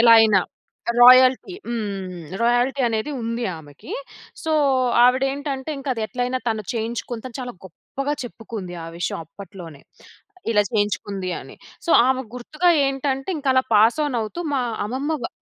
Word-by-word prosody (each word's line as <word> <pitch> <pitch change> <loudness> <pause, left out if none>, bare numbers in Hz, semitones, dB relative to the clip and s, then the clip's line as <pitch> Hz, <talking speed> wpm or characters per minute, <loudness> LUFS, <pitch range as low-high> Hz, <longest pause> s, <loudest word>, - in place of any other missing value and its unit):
ఎలా 230 0 +8
అయినా. 215 -3 +5 0.6
రాయల్టీ. 255 +7 +7
హ్మ్. 195 -6 -4 0.2
రాయల్టీ 245 +3 +2
అనేది 225 +5 -2
ఉంది 230 +1 -2
ఆమెకి. 150 - -12 0.5
సో, 320 - 0 0.5
ఆవిడేంటంటే 270 +2 +1
ఇంకది 260 -5 -2
ఎట్లైనా 250 +2 -2
తను 220 -1 -1
చేయించుకుంతా 230 +1 -4
అని 235 - -8
చాలా 245 -1 -6
గొప్పగా 275 - -5
చెప్పుకుంది. 220 -6 -7
ఆ - - -7
విషయం 175 - -2
అప్పట్లోనే. 170 -4 -11 0.7
ఇలా 210 -2 +4
చేయించుకుంది 205 -3 -1
అని. - - -12 0.3
సో, - - 0 0.2
ఆమెకు 260 -3 -1
గుర్తుగా 305 +8 +1 0.2
ఏంటంటే 270 0 -2
ఇంకలా 265 -2 +2
పాస్ 220 +6 +5
ఆన్ 270 -4 -2
అవుతూ 220 +11 -5
మా 270 - +2 0.3
అమ్మమ్మ 270 +7 -2
వా - - -1
240 Hz, 135 wpm, -22 LUFS, 210-265 Hz, 0.7 s, ఎలా